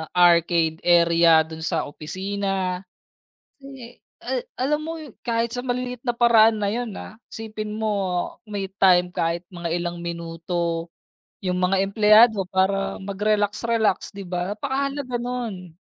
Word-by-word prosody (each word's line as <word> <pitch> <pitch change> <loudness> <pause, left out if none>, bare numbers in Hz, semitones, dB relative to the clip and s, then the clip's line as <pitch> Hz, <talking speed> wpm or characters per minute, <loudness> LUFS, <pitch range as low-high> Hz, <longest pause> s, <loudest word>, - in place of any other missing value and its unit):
arcade 170 -2 +4
area 170 -1 +5
dun 160 0 -10
sa 160 0 -1
opisina. 190 +4 -3 0.8
Eh, 260 -3 -12 0.2
ah, - - -3 0.2
alam 300 +4 0
mo 325 0 -5 0.2
kahit 230 0 -1
sa 245 - -4
maliit 250 -1 -3
na 240 - +1
paraan 225 -2 +5
na 205 - 0
yun, 230 +1 -2
ah, 220 - -10 0.2
isipin 215 -1 -6
mo 220 +1 -2 0.6
may 205 -3 -4
time 180 -2 +5
kahit 170 0 -2
mga 170 -2 -6
ilang 175 0 -3
minuto 170 0 -3 0.5
yung 180 -1 -1
mga 190 +1 +2
empleyado 210 0 +5
para 195 +1 0
mag-relax 205 +1 0
relax, 220 -3 0
di 200 - -6
ba, 180 +3 -3
napakahalaga 275 0 -2
nun. 225 -9 -5
195 Hz, 130 wpm, -23 LUFS, 175-230 Hz, 0.8 s, area